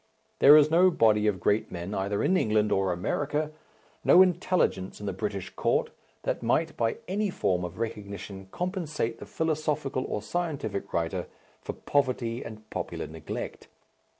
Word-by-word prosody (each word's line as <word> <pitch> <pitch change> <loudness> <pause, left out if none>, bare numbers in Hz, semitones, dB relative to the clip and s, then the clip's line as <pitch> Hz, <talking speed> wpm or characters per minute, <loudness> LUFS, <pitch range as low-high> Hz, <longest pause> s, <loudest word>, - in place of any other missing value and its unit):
There 145 +2 +9
is 155 0 +5
no 180 +3 +6
body 110 -9 +3
of 100 -3 +1
great 105 +4 +1
men 90 +3 -5
either 100 +1 -1
in 190 - +3
England 110 - +2
or 95 -1 +2
America, 145 - -1 0.5
no 185 - +8
intelligence 175 - 0
in 105 - -7
the 100 - -2
British 100 0 -4
Court, - - 0 0.3
that - - -1
might 155 +8 +1
by 115 -1 0
any 205 +2 0
form 90 - 0
of 90 0 -6
recognition 100 -3 -5
compensate 160 - -3
the - - -9
philosophical 155 -4 -1
or 105 - -3
scientific 150 - -3
writer 85 -1 -1 0.3
for - - -5
poverty 125 -4 0
and 110 -1 -10
popular - - -4
neglect. - - -6
115 Hz, 150 wpm, -28 LUFS, 100-155 Hz, 0.5 s, There